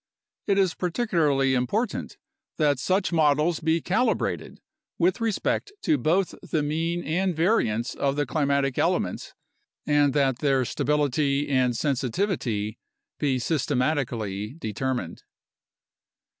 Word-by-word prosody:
It 200 -1 +2
is 190 -4 +3
particularly 165 - +1
important 200 - -1 0.4
that 145 -4 +2
such 190 +6 +1
models 155 +1 +3
be 160 +1 +1
calibrated 220 +8 -1 0.4
with 185 +6 +1
respect 230 - -1
to 150 - +2
both 170 +8 +1
the 155 -2 -1
mean 165 +3 -1
and 180 +4 0
variance 150 - +1
of 140 0 -1
the 145 0 0
climatic 140 -1 0
elements - - -1 0.5
and 145 -1 +3
that 135 -4 +1
their 135 -3 +2
stability 145 0 0
and 125 -3 +2
sensitivity 125 - -1 0.4
be 140 -3 +1
systematically 125 - -1
determined. 120 - -3
145 Hz, 110 wpm, -25 LUFS, 130-170 Hz, 0.5 s, is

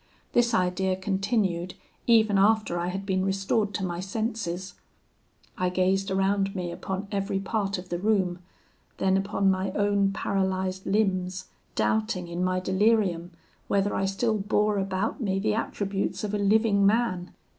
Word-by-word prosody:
This 235 -1 +3
idea 185 0 +1
continued 190 -2 -1 0.3
even 220 -4 +5
after 215 -3 +3
I 175 - -1
had 190 +2 -4
been 190 -1 0
restored 195 +2 0
to 190 - -1
my 175 -1 -3
senses. 195 -2 -3 0.9
I 180 0 +2
gazed 190 +2 +1
around 195 +1 +1
me 180 -2 -3
upon 190 +3 -4
every 195 -1 -1
part 200 0 -1
of 180 0 -9
the 175 - -2
room, 190 -3 +1 0.6
then 190 0 +2
upon 195 0 +2
my 190 +1 -1
own 200 -1 +2
paralysed 190 -1 -1
limbs, 185 -3 0 0.3
doubting, 110 +11 0
in 170 +1 -3
my 185 0 +1
delirium, 190 -2 +1 0.4
whether 200 0 +1
I 195 - 0
still 215 +3 0
bore 210 +1 +1
about 195 +7 -2
me 195 -4 0
the 210 +2 +1
attributes 200 -3 -2
of 210 -1 -3
a 210 - 0
living 205 0 +3
man. 200 -4 +2
195 Hz, 150 wpm, -27 LUFS, 185-205 Hz, 0.9 s, even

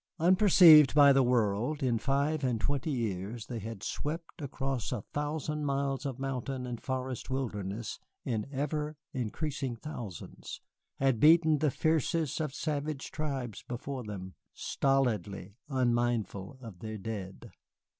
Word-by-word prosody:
Unperceived 170 - +7
by 140 -2 +8
the 135 - +5
world, 120 +3 +1
in 120 -3 +2
five 140 +4 0
and 125 -4 +1
twenty 140 +5 -1
years 110 -3 -3
they 120 -1 -5
had 110 -1 -7
swept 165 +2 -4
across 135 -4 -3
a 120 -6 -3
thousand 150 +1 -2
miles 140 0 -1
of 130 -3 -5
mountain 135 -1 -3
and 120 -2 -5
forest 130 -1 -4
wilderness 110 -5 -3 0.3
in 110 -4 -2
ever 150 +2 -2 0.2
increasing 130 +1 -3
thousands, 115 - -8 0.4
had 135 -4 +2
beaten 160 0 +6
the 150 - +3
fiercest 160 0 0
of 150 -3 -2
savage 145 -1 -3
tribes 135 -9 -4
before 125 +2 -5
them, 95 -3 -7 0.2
stolidly 110 -8 0 0.2
unmindful 120 -4 0
of 110 -8 -10
their 110 +1 -5
dead. 105 0 -6
130 Hz, 130 wpm, -31 LUFS, 115-150 Hz, 0.4 s, by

